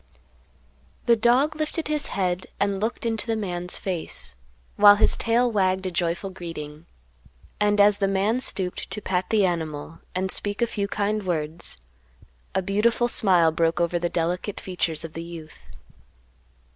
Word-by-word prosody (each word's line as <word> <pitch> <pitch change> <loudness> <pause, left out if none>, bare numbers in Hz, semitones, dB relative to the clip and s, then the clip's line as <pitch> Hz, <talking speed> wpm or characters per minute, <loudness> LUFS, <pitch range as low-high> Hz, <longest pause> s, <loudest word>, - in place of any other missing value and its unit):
The 235 -2 +5
dog 250 +7 +3
lifted 310 +1 -2
his 300 -1 -1
head 185 -1 -2
and 200 -1 0
looked 225 +3 -3
into 225 -1 -2
the 225 - 0
man's 180 -4 -1
face, 175 - -2 0.4
while 205 0 +8
his 205 - +4
tail 240 +1 +1
wagged 190 -2 +1
a 185 - -2
joyful 175 +2 -2
greeting, 165 -3 -8 0.7
and, 205 0 +2
as 205 0 +5
the 195 - +2
man 200 +5 +1
stooped 185 -7 -1
to - - -4
pat 185 -2 -2
the 215 -3 +3
animal 160 -2 -3 0.2
and 185 0 -1
speak 205 0 -2
a 240 - +3
few 205 -3 -3
kind 210 +1 -1
words, 160 - -3 0.8
a 190 - +1
beautiful 215 +5 +2
smile 180 -8 +4
broke 165 +1 +1
over 175 0 +1
the 175 0 -1
delicate 175 +4 -2
features 165 -4 -2
of 160 - -9
the 165 - -5
youth. 165 -2 -10
190 Hz, 160 wpm, -24 LUFS, 170-210 Hz, 0.8 s, while